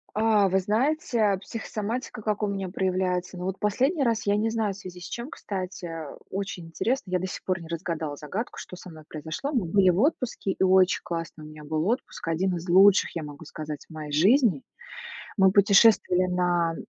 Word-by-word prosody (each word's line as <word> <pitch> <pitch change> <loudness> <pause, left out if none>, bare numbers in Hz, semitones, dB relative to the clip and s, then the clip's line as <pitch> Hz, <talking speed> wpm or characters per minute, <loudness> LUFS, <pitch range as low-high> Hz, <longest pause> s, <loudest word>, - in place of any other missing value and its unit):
А 215 -2 +4
вы 190 +1 +3
знаете, 220 -1 +1
психосоматика 225 +2 -5
как 210 0 -1
у 210 - +1
меня 195 -2 -3
проявляется? 185 -1 -1
Ну, 180 - -5
вот 190 0 -3
последний 265 - +1
раз 230 -3 0
я 200 0 +3
не 215 +2 +1
знаю, 220 -3 -1
в - - -12
связи 180 -2 -9
с - - -10
чем, 235 +3 -6
кстати. 185 - -5 0.4
Очень 190 -3 -4
интересно, 220 +5 -2
я 180 - +2
до 185 - -3
сих - - -7
пор 185 -1 -1
не 165 - -10
разгадала 160 -2 -3
загадку, 175 - -5
что - - -8
со 180 - -11
мной 160 -2 -12
произошло. 160 - -5
Мы 235 -9 +1
были 185 +2 +4
в 180 +1 +2
отпуске, 255 - 0
и 190 - -1
очень 185 0 +4
классный 165 -2 -5
у - - -9
меня 155 0 -11
был 155 +3 -1
отпуск, 235 -6 -3
один 180 +3 0
из 170 +1 -6
лучших, 190 +3 +5
я 165 - -3
могу 150 +2 -9
сказать, 150 -1 -7
в - - -14
моей 155 -1 -7
жизни. 190 - +4 0.7
Мы 190 -2 +5
путешествовали 200 -2 +5
на 175 -2 +1
190 Hz, 200 wpm, -26 LUFS, 170-210 Hz, 0.7 s, лучших